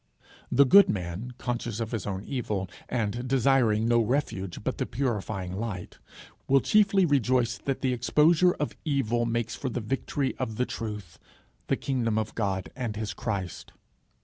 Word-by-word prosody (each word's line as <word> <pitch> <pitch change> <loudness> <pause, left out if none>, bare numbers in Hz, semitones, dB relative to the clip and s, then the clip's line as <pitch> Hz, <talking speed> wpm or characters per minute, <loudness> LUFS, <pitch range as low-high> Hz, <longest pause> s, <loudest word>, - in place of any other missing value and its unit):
The 140 +3 +6
good 200 +10 +7
man, 95 +6 -4
conscious 120 -3 -3
of 115 -1 -3
his 115 -5 -3
own 95 -1 -3
evil, 105 -8 -3 0.2
and 120 +1 -2
desiring 125 -4 +3
no 120 0 +4
refuge 110 -6 -1
but - - -2
the - - -1
purifying 105 -7 -2
light, 100 -4 -5 0.5
will 135 +1 +5
chiefly 200 +2 +4
rejoice 125 -4 +2
that 135 -1 -3
the 130 -1 +1
exposure 160 +8 +4
of 150 - -3
evil 120 -6 0
makes 115 0 -1
for 130 - -3
the 125 - -3
victory 135 +4 -2
of 110 - -2
the 125 - +1
truth, 105 -9 -6 0.5
the - - +1
kingdom 120 -5 -1
of 110 -1 -2
God 95 -4 -2
and 120 -5 -3
his 105 -1 -3
Christ. 95 -6 -4
120 Hz, 160 wpm, -27 LUFS, 105-135 Hz, 0.5 s, good